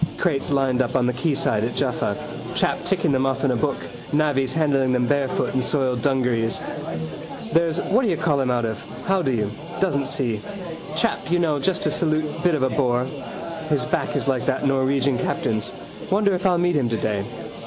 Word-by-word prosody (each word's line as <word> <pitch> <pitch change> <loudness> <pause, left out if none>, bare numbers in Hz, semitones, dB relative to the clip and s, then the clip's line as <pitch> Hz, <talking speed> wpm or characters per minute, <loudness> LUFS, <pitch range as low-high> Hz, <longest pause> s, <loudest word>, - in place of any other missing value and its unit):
Crates 145 -7 0
lined 135 -2 +2
up 125 - -2
on 125 -2 +3
the 125 - +1
quayside 130 -6 +1
at 120 +1 -2
Jaffa, - - 0 0.4
chap - - +1
ticking - - +2
them 135 0 +2
off 135 +1 -1
in 140 - +3
a - - +1
book, 115 - 0 0.3
navvies 145 -3 +2
handling 140 -5 +2
them 125 -1 +2
barefoot 140 0 0
in 130 - +2
soiled 130 -3 +1
dungarees. 125 -4 +1 0.9
There's 165 0 +3
whatdoyoucallhim 165 - +1
out 120 -1 +1
of. 110 -2 -3 0.3
How 190 -1 +2
do 135 - +1
you? 105 -4 0 0.3
Doesn't 140 -8 +1
see. 115 -6 -1 0.6
Chap 230 -2 0
you 175 - +3
know 160 -4 +1
just 185 +5 0
to 150 - +1
salute 155 0 0
bit 175 -3 +4
of 140 - 0
a 130 - +3
bore. 125 -2 +1 0.6
His 140 -5 +2
back 155 0 -1
is - - 0
like 130 -3 0
that - - +1
Norwegian 135 -1 +2
captain's. 110 -2 -1 0.4
Wonder 200 0 +3
if 185 +1 +1
I'll 180 -2 +3
meet 175 0 +2
him 130 -5 +2
today. 105 -3 -1
135 Hz, 185 wpm, -23 LUFS, 125-155 Hz, 0.9 s, bit